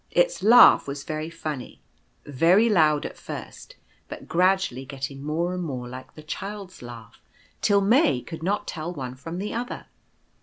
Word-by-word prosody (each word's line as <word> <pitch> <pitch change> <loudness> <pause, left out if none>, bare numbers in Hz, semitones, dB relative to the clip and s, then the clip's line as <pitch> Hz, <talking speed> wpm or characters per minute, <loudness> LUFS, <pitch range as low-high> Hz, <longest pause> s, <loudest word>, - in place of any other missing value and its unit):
Its - - +1
laugh 225 -4 +7
was 140 0 -5
very 155 +1 -4
funny, 155 -6 -6 0.5
very 170 - +4
loud 155 -7 +3
at - - -6
first, - - -9 0.3
but - - -9
gradually 180 -7 +1
getting 135 0 -6
more 165 +4 -1
and 180 - -3
more 130 -7 -5
like 130 +1 -10
the 155 - -11
Child's 195 +4 -7
laugh, 120 -3 -11 0.4
till 200 -1 +3
May 205 - +3
could 165 -1 -8
not 195 +5 -1
tell 165 +1 -4
one 130 -7 -6
from 165 +7 -8
the 205 +3 -4
other. 240 +2 -5
165 Hz, 160 wpm, -25 LUFS, 140-195 Hz, 0.5 s, laugh